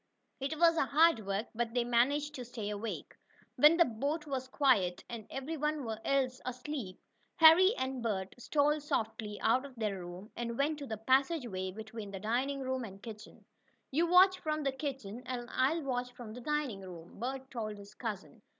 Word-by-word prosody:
It 275 +3 -3
was 335 0 +5
hard 280 -6 +4
work, 200 +3 -1
but 235 +1 -2
they 245 - +3
managed 275 +5 +2
to 255 - -6
stay 225 -4 -5
awake. 210 +2 -5 0.4
When 305 +3 +7
the 340 - +6
boat 285 +7 -2
was 265 -3 -3
quiet, 225 -11 +2
and 230 -3 -7
every 280 +5 -4
one 300 -3 -1 0.2
else 265 -2 +1
asleep, 250 -6 -5 0.4
Harry 355 +6 +8
and 260 -1 -2
Bert 195 -5 -2
stole 295 +4 +2
softly 220 -6 -3
out 250 +3 +3
of 275 -2 -10
their 210 -4 -2
room 175 +4 -9
and 235 -1 -3
went 295 +2 +1
to 280 - -6
the 220 - -4
passageway 250 - +1
between 215 +1 -7
the 195 -1 -6
dining 255 +7 -1
room 260 -1 -2
and 195 -2 -9
kitchen. 215 -2 -10 0.5
"You 325 +5 +2
watch 370 +2 +6
from 305 -1 -2
the 275 - +1
kitchen, 265 -5 -5
and 245 -1 -4
I'll 295 +5 +1
watch 250 -2 -2
from 235 -3 -9
the 250 - -8
dining 290 -7 -1
room," 175 -2 -11
Bert 265 +3 -4
told 215 -4 -4
his 200 +1 -12
cousin. 215 -4 -6
250 Hz, 180 wpm, -33 LUFS, 220-290 Hz, 0.5 s, Harry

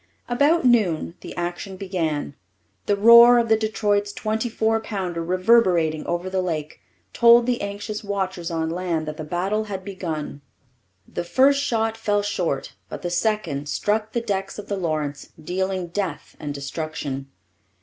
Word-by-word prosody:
About 285 +6 +2
noon 200 -10 +2
the - - -9
action 175 +2 -4
began. 165 -7 -2 0.5
The 205 - +3
roar 235 +3 +8
of 235 -1 +1
the 220 - +6
Detroit's 205 -2 0
twenty 220 +3 -2
four 225 0 +1
pounder, 185 -6 -4
reverberating 180 -4 +2
over 175 +1 -2
the 185 0 -1
lake, 155 -4 -4 0.3
told 235 0 +6
the 245 -1 0
anxious 205 +1 -5
watchers 190 -4 -3
on 160 -1 -2
land 170 -3 -2
that 155 0 -5
the 155 - -5
battle 190 +7 -1
had 190 -3 -6
begun. 165 -7 -5 0.7
The - - -4
first 275 +9 +3
shot 225 -4 0
fell 205 -2 0
short, 180 -8 -2 0.2
but - - -7
the 175 - -2
second 175 -7 -1
struck 210 +9 0
the 235 - 0
decks 195 -4 -3
of 205 -1 -8
the 200 - 0
Lawrence, 155 -6 -3
dealing 185 +2 -2
death 180 -4 -4
and 145 - -4
destruction. 140 -1 -5
190 Hz, 155 wpm, -23 LUFS, 165-220 Hz, 0.7 s, roar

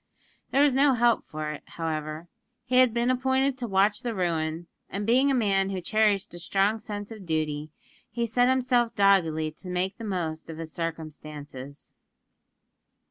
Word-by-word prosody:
There 275 - +4
was 290 -3 +4
no 275 +1 +4
help 240 -1 +3
for 155 0 -4
it, 150 - -7
however. 155 0 -4 0.4
He 250 0 +1
had 255 -2 +6
been 235 +2 +1
appointed 265 +1 +1
to 240 - -3
watch 205 +2 +2
the 240 -3 -3
ruin; 165 -2 -1 0.2
and, 205 +1 -3
being 255 +5 +4
a 275 - +2
man 195 -5 +2
who 190 -1 -2
cherished 205 +1 +1
a 175 - -7
strong 195 +5 +1
sense 205 -1 -6
of 215 -3 -9
duty, 155 -3 -2 0.4
he 235 -1 -2
set 245 +2 +3
himself 250 -2 +2
doggedly 165 -6 +3
to 180 +4 -10
make 180 +3 -2
the - - -6
most 165 -6 -3
of 160 - -7
his 160 -1 -7
circumstances. 150 -4 -7
195 Hz, 170 wpm, -27 LUFS, 160-235 Hz, 0.4 s, had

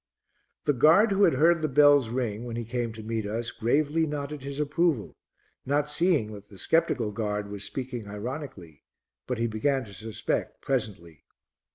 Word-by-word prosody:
The 145 - +2
guard 165 - +5
who 200 +1 +5
had 160 - +3
heard 165 +4 +4
the 155 - +1
bells 145 -3 +5
ring, 115 -3 -2
when 120 -1 -5
he 115 0 -4
came 120 0 -2
to 110 -1 -9
meet 110 -1 -3
us, 115 +2 -3
gravely 150 +7 +1
nodded 145 0 -4
his 140 +1 -6
approval, 150 -4 0 0.5
not 145 +2 0
seeing 150 -9 +1
that 105 0 -11
the 100 - -14
sceptical 120 - +1
guard 105 -1 -3
was 100 -1 -4
speaking 125 -4 -5
ironically, 105 - -7 0.4
but 125 - -2
he 115 - 0
began 125 +4 0
to 100 - -12
suspect 110 +3 -3
presently. 95 - -3
125 Hz, 170 wpm, -27 LUFS, 110-145 Hz, 0.5 s, guard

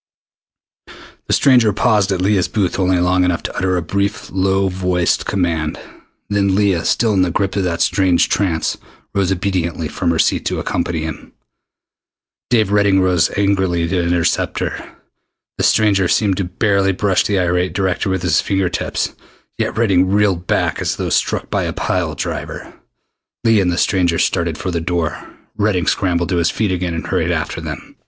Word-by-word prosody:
The - - 0
stranger 125 -6 +4
paused 105 -2 +2
at 95 -1 -1
Leah's 95 -1 +2
booth 100 -4 -1
only 95 -1 +2
long 90 +1 +2
enough 90 -2 0
to - - -5
utter 95 0 0
a - - 0
brief 100 +5 -2
low 95 +1 +1
voiced 90 -2 0
command. 85 -5 -1 0.5
Then 100 -2 +1
Leah, 100 -4 +1
still 115 -3 +2
in 95 - +2
the 90 - +2
grip 95 +3 -1
of 100 - 0
that 85 -1 -2
strange 95 -3 +2
trance, 85 -6 0 0.4
rose 95 -2 +1
obediently 90 -4 -1
from 85 - -2
her 85 - +1
seat - - +1
to - - -1
accompany 85 -2 -2
him. 80 -1 -7 1.2
Dave 110 -5 +2
Redding 100 -2 +3
rose 90 -3 +2
angrily 95 -4 +1
to 90 +1 0
intercept 85 -1 0
her. - - -5 0.6
The - - 0
stranger 100 -4 +3
seemed 100 0 +1
to 95 - -1
barely 95 +1 +1
brush 95 -1 +1
the 100 - 0
irate 90 0 0
director 95 0 -1
with 95 -2 -1
his 85 -3 +2
finger 95 -2 0
tips, - - -2 0.5
yet - - -2
Redding 95 -5 +3
reeled 100 -3 +1
back - - 0
as - - -1
though - - -3
struck - - 0
by - - 0
a - - -3
pile - - -2
driver. - - -5 0.7
Leah 115 -3 +4
and 90 -2 +1
the 85 - -2
stranger 90 -4 +1
started 85 -2 0
for 95 - -3
the 85 -1 -2
door. 80 -3 -2 0.4
Redding 100 -4 +1
scrambled 85 -3 0
to 90 - 0
his 85 -1 +2
feet 105 -4 -1
again 90 -2 -2
and 80 - -4
hurried - - 0
after - - -3
them. - - -8
95 Hz, 175 wpm, -18 LUFS, 85-100 Hz, 1.2 s, stranger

